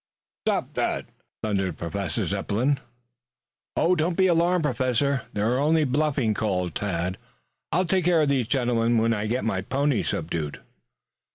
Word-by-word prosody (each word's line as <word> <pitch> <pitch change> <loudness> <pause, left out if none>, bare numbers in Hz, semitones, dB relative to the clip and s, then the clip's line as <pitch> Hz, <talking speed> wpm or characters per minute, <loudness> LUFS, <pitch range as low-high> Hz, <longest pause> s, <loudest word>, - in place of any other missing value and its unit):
"Stop - - 0
that!" - - -1 0.4
thundered 95 -5 0
the - - -25
Professor. 100 -5 -2 1.5
"Don't 170 0 +2
be 190 - +4
alarmed, 175 0 +3
Professor. 130 -1 0
They 100 - -2
are 120 +5 +2
only 155 +2 +3
bluffing," 135 -4 +1
called 90 -5 -1
Tad. 90 -2 -2 0.5
"I'll 185 +3 +2
take 185 0 +1
care 170 -3 +4
of 145 - +1
these 130 -5 +1
gentlemen 120 -3 +2
when 115 +1 +3
I 105 -1 -2
get 125 +4 -1
my 95 -4 0
pony 135 +4 +1
subdued." 80 -2 -3
125 Hz, 145 wpm, -25 LUFS, 100-155 Hz, 1.5 s, be